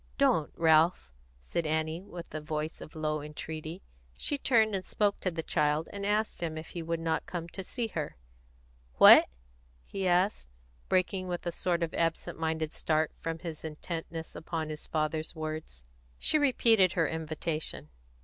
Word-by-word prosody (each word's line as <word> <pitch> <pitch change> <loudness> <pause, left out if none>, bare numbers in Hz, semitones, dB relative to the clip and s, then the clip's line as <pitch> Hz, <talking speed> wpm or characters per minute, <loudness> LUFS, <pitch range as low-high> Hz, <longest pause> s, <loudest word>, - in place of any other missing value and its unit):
"Don't, 155 -2 +3
Ralph!" 160 - +4 0.3
said 155 - -2
Annie, 160 +2 0
with 175 -3 -10
a 155 - -3
voice 155 +1 -4
of 155 - -10
low 155 -1 -1
entreaty. 155 +3 -6 0.3
She 290 - 0
turned 220 -5 +4
and 190 -1 -1
spoke 205 +1 0
to 185 - 0
the 165 -2 -4
child, 150 0 +1
and 200 0 -3
asked 210 -1 0
him 160 -2 -2
if 160 +1 -7
he 170 - -5
would 165 0 -2
not 165 -1 -1
come 170 -2 -4
to 190 - -6
see 240 +5 -3
her. 155 -7 -4 0.8
"What?" - - +10 0.6
he 195 -1 -2
asked, 180 - +2 0.4
breaking 185 0 +1
with 175 0 -4
a 175 - 0
sort 170 0 0
of 165 - -2
absent 165 -1 -1
minded 160 -1 -1
start 155 -1 +1
from 165 0 -3
his 165 -2 -7
intentness 160 +1 -6
upon 160 -1 -4
his 155 0 -6
father's 155 +1 -1
words. 155 - -6 0.3
She 310 - +3
repeated 230 -9 +5
her 165 -3 +2
invitation. 160 0 -3
165 Hz, 165 wpm, -30 LUFS, 155-180 Hz, 0.8 s, What